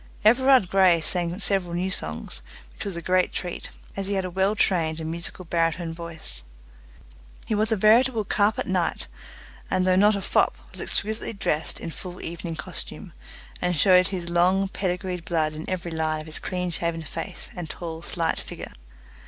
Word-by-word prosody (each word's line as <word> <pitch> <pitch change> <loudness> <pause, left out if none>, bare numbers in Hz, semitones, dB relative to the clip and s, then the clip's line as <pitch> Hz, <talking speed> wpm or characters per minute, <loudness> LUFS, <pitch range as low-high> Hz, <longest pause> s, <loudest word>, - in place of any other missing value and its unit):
Everard 255 -1 +6
Grey 185 -3 +5
sang 175 +2 +2
several 190 -4 +2
new 185 +2 -1
songs, 75 - 0 0.3
which - - -7
was 195 -3 -4
a 170 - -6
great 185 +1 +2
treat, 180 -1 -4 0.3
as 195 -1 -3
he 200 - 0
had 190 -1 0
a 180 - -4
well 190 +3 +1
trained 165 -6 +1
and 160 0 -4
musical 170 +2 -2
baritone 165 0 0
voice. 165 - -1 1.0
He - - -2
was 215 +2 +2
a - - +4
veritable 225 +3 +4
carpet 205 +2 +1
knight, 185 -2 0 0.6
and 185 -1 +1
though 185 0 +4
not 205 +3 +5
a 200 - -3
fop, - - +2
was - - -7
exquisitely 220 +2 -1
dressed 160 -6 -1
in 165 - -5
full 180 +2 -8
evening 170 0 -5
costume, 155 - -4 0.5
and 180 0 +1
showed 180 +3 +5
his 175 -3 -4
long 185 +3 +3
pedigreed 180 -2 -2
blood 160 -3 0
in 155 +1 -7
every 175 -2 -3
line 160 -1 -1
of - - -10
his 155 -1 -3
clean 180 -1 -2
shaven 165 -1 -2
face 155 - -5
and 175 -3 -6
tall 165 -1 -6
slight 170 -1 -1
figure. - - -8
180 Hz, 175 wpm, -25 LUFS, 165-195 Hz, 1.0 s, Everard